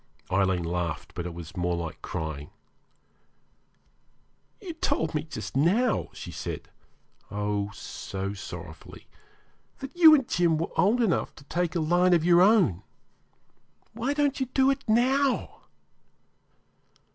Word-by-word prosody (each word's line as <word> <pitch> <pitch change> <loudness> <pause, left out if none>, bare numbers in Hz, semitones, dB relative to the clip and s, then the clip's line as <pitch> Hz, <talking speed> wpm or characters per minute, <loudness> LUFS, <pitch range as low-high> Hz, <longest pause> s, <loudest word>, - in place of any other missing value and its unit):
Aileen 95 -2 +2
laughed, 85 -1 -3
but 85 0 -4
it 85 - -6
was 85 -2 -9
more 90 -1 0
like 85 -2 -6
crying. 80 -1 -5 2.1
'You 370 -5 -7
told 160 - -1
me 150 - 0
just 155 -4 -7
now,' 205 - +2
she - - -9
said - - -6 0.6
oh! 105 0 -2
so 100 0 -6
sorrowfully 85 -4 -10 0.7
'that 270 +3 -8
you 325 -3 +9
and 270 -5 0
Jim 170 -3 +2
were 165 - -3
old 230 +6 +3
enough 195 -6 0
to 145 - -14
take 175 +4 -2
a - - +1
line 175 +3 +3
of 165 -1 +1
your 175 0 +6
own. 185 - +4 1.1
Why 245 +6 -2
don't 290 -2 +1
you 265 - -1
do 265 +2 +3
it 270 0 -3
now?' 260 +4 +1
165 Hz, 135 wpm, -27 LUFS, -, 2.1 s, you